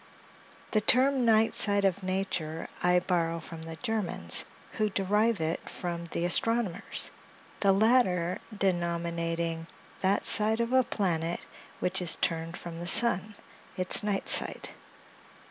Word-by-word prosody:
The 215 - +1
term 260 +3 +2
"Night 225 0 +2
Side 200 -1 +4
of 195 +1 -1
Nature" 185 -4 -4
I 180 0 +2
borrow 170 -2 -2
from 165 0 -11
the 165 0 -8
Germans, 215 +2 +3 0.3
who 215 -1 -2
derive 210 +3 0
it 160 +1 -4
from 170 -1 -6
the 170 0 -4
astronomers, 205 +1 +1 0.5
the 200 - +3
latter 190 -5 +1 0.2
denominating 170 -2 -3 0.3
that 195 +1 -1
side 220 +1 +3
of 235 +2 -2
a 260 - +5
planet 170 -7 -3 0.3
which 185 +1 0
is 175 -3 +3
turned 165 0 -3
from 170 -1 -9
the 175 - -6
sun, 210 0 +4 0.4
its 185 +5 +4
night 205 -2 -3
side. - - +3
185 Hz, 130 wpm, -27 LUFS, 170-215 Hz, 0.5 s, a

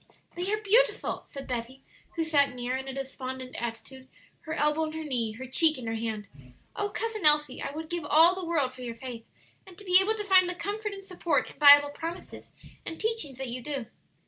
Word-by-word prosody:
'" - - -35
"They 360 +3 -2
are 425 - +1
beautiful," 430 +4 +1
said 275 -1 -8
Betty, 250 +2 -5 0.3
who 330 - 0
sat 285 -5 +2
near, 245 +1 -2
in 265 +1 -5
a 265 - -5
despondent 260 -1 -6
attitude, 250 +3 -7 0.3
her 315 - -6
elbow 300 +2 +1
on 310 - -6
her 320 0 -5
knee, 240 -7 -2
her 255 +4 -8
cheek 310 +4 +3
in 250 - -7
her 225 - -2
hand. 220 -2 -4 0.5
"Oh, 410 0 -1
Cousin 445 -1 -4
Elsie, 300 0 +3
I - - -3
would 315 +2 -6
give 345 0 -4
all 325 +4 +6
the 375 0 -6
world 305 -7 0
for 255 - -12
your 235 -2 -5
faith, 235 -2 -8 0.4
and 365 -2 -14
to 410 - -10
be 365 0 +7
able 430 +3 +1
to 425 - -4
find 375 -3 +5
the 355 - -3
comfort 415 +2 -4
and 390 -1 -10
support 360 -3 -1
in - - -20
Bible 290 0 +8
promises 335 +4 -7 0.3
and 325 - -7
teachings 435 - -1
that 265 -1 -5
you 250 +1 -5
do!" 275 -2 -4
300 Hz, 225 wpm, -28 LUFS, 255-360 Hz, 0.5 s, Bible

